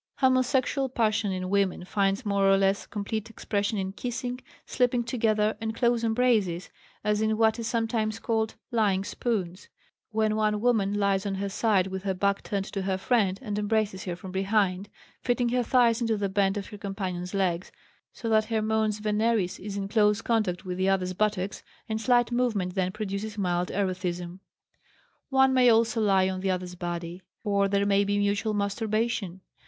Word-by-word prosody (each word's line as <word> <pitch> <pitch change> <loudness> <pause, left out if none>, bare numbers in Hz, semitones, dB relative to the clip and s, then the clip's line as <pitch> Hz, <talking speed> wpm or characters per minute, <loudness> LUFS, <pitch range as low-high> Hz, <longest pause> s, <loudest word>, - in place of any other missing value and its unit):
Homosexual 260 +1 +2
passion 220 -4 +1
in 185 0 -3
women 195 -3 +1
finds 195 +3 0
more 200 -1 +2
or 195 - +5
less 195 0 +1
complete 215 +1 -4
expression 205 -1 -2
in 190 -1 -2
kissing, 245 +3 -4 0.3
sleeping 245 -1 +1
together, 220 -3 +1
and 220 0 -3
close 235 -1 +1
embraces, 220 -7 +1 0.3
as 210 0 +1
in 220 0 +1
what 220 +1 +3
is 230 - -3
sometimes 225 -2 -1
called 220 -1 -1 0.2
"lying 205 -5 +2
spoons," 195 -5 -3 0.4
when 215 -1 +1
one 215 -1 +1
woman 220 -4 +2
lies 200 -1 +1
on 195 - -2
her 200 +1 -3
side 200 -2 +2
with 190 0 -5
her 190 -1 -2
back 200 +2 +1
turned 200 -1 -3
to 195 - -4
her 190 0 -1
friend 195 -2 +1
and 210 -3 -2
embraces 210 -2 -1
her 180 -2 -3
from 185 +1 -9
behind, 195 0 0 0.3
fitting 245 -1 +1
her 250 +1 +1
thighs 240 -1 +3
into 225 -2 +1
the 200 -1 -1
bend 195 0 +1
of 200 - -4
her 210 -2 -10
companion's 190 -2 -4
legs, 185 -2 0 0.4
so 235 - -7
that 220 -1 +3
her 220 -1 -1
mons 220 -1 +1
veneris 215 -2 0
is 200 0 -6
in 200 - -2
dose 210 +1 +2
contact 210 -6 0
with 180 0 -4
the 190 +1 +2
other's 185 -1 0
buttocks, 200 -1 -1 0.3
and 220 0 -2
slight 240 0 +3
movement 220 -7 0
then 185 -1 0
produces 210 +1 -4
mild 180 -2 0
erethism. 180 -2 -3 0.9
One 265 -1 +4
may 250 -1 +5
also 225 0 +3
lie 195 -3 +3
on 190 0 -2
the 190 +1 -1
other's 180 -1 -2
body, 175 0 -5 0.2
or 200 -2 +2
there 200 0 +1
may 200 0 +3
be 205 0 0
mutual 205 +1 0
masturbation. 205 -2 -1
205 Hz, 180 wpm, -27 LUFS, 190-225 Hz, 0.9 s, or